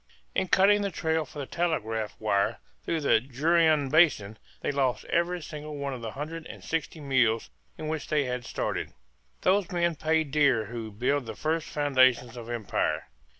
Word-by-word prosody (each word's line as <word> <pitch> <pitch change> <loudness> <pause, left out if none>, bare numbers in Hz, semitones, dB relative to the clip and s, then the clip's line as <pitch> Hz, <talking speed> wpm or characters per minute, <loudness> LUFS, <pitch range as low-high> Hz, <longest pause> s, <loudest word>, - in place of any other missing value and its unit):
In 190 - 0
cutting 205 +3 +5
the 200 - 0
trail 160 -2 -1
for 145 - -13
the 140 - -3
telegraph 115 -11 -2
line 100 -2 +1 0.3
through 165 -1 -1
the 125 -6 +4
Juruena 155 +3 +2
basin 130 -11 +3 0.2
they - - 0
lost 135 -3 0
every 175 0 0
single 150 -1 -7
one 140 -1 -3
of 125 - -7
the 115 -2 -5
hundred 160 +3 -6
and - - -10
sixty 160 0 -3
mules 125 -6 +1 0.3
with 155 - -5
which 155 -1 -3
they 150 -2 +2
had 125 -1 -3
started. - - -3 0.5
Those 195 0 +2
men 170 -1 +1
pay 160 +1 +1
dear 140 -6 +2
who 115 0 -6
build 125 +5 0
the - - -5
first 160 +1 -1
foundations 130 -4 +3
of 120 -1 -8
empire! 95 - -1
145 Hz, 175 wpm, -28 LUFS, 120-160 Hz, 0.5 s, cutting